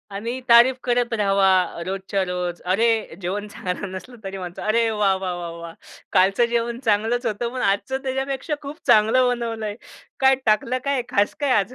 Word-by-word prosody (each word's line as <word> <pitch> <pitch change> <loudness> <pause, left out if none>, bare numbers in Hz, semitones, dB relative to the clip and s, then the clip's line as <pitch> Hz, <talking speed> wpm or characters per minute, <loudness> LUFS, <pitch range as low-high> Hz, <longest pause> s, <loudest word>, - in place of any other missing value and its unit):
आणि 235 +5 -4
तारीफ 240 +2 +7
करत 245 -1 0
रहावा 195 -4 +2
रोजच्या 195 +1 -2
रोज. 180 -1 -4
अरे, 220 0 +1
जेवण 200 +4 -3
चांगलं 190 -1 -5
नसलं 240 +7 -8
तरी 195 0 -6
म्हणतो, 180 -1 -7
"अरे, 225 +1 +2
वाह, 205 -3 +2
वाह, 185 -2 -3
वाह, 170 -1 -5
वाह! 170 -1 -8 0.4
कालचं 195 +5 +4
जेवण 235 0 -1
चांगलंच 225 +1 0
होतं, 230 +2 -2
पण 255 - -3
आजचं 265 +7 0
त्याच्यापेक्षा 270 +3 -2
खूप 290 +2 -8
चांगलं 240 +2 +5
बनवलंय, 230 -3 -2 0.4
काय 265 0 +5
टाकलं 220 +4 +2
काय 275 -2 +1
खास 205 0 +1
काय 285 -3 +1
आज?" 220 +6 -3
220 Hz, 170 wpm, -22 LUFS, 195-245 Hz, 0.4 s, तारीफ